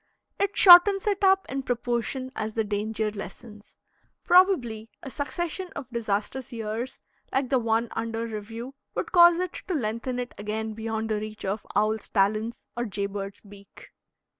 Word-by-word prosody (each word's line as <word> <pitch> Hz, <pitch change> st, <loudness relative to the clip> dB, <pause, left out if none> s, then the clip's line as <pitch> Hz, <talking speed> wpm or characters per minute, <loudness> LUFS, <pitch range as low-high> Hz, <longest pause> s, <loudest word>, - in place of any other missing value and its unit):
It 400 Hz, 0 st, 0 dB
shortens 385 Hz, +2 st, +8 dB
it 410 Hz, -1 st, 0 dB
up 385 Hz, 0 st, +4 dB
in 270 Hz, +1 st, -3 dB
proportion 245 Hz, +1 st, -2 dB
as 215 Hz, 0 st, -4 dB
the 225 Hz, -, +1 dB
danger 215 Hz, +1 st, -2 dB
lessens. 210 Hz, +1 st, -10 dB, 0.5 s
Probably 265 Hz, -, +3 dB
a 270 Hz, -, -7 dB
succession 340 Hz, -, -4 dB
of 255 Hz, -2 st, -7 dB
disastrous 230 Hz, +3 st, -2 dB
years, 225 Hz, +2 st, -4 dB, 0.3 s
like 265 Hz, -1 st, 0 dB
the 265 Hz, -, +3 dB
one 225 Hz, 0 st, +1 dB
under 230 Hz, 0 st, -3 dB
review, 225 Hz, +3 st, -7 dB, 0.2 s
would -, -, -3 dB
cause 345 Hz, -1 st, +7 dB
it 365 Hz, 0 st, -2 dB
to 370 Hz, -, -1 dB
lengthen 240 Hz, 0 st, -2 dB
it 245 Hz, 0 st, -4 dB
again 220 Hz, +1 st, -3 dB
beyond 220 Hz, 0 st, -3 dB
the 215 Hz, -1 st, 0 dB
reach 215 Hz, -1 st, -7 dB
of 200 Hz, +3 st, -3 dB
owl's 215 Hz, 0 st, +1 dB
talons 215 Hz, +3 st, 0 dB
or 240 Hz, 0 st, -2 dB
jay 200 Hz, -2 st, -3 dB
bird's 195 Hz, 0 st, -6 dB
beak. 200 Hz, -1 st, -15 dB
225 Hz, 160 wpm, -26 LUFS, 215-265 Hz, 0.5 s, shortens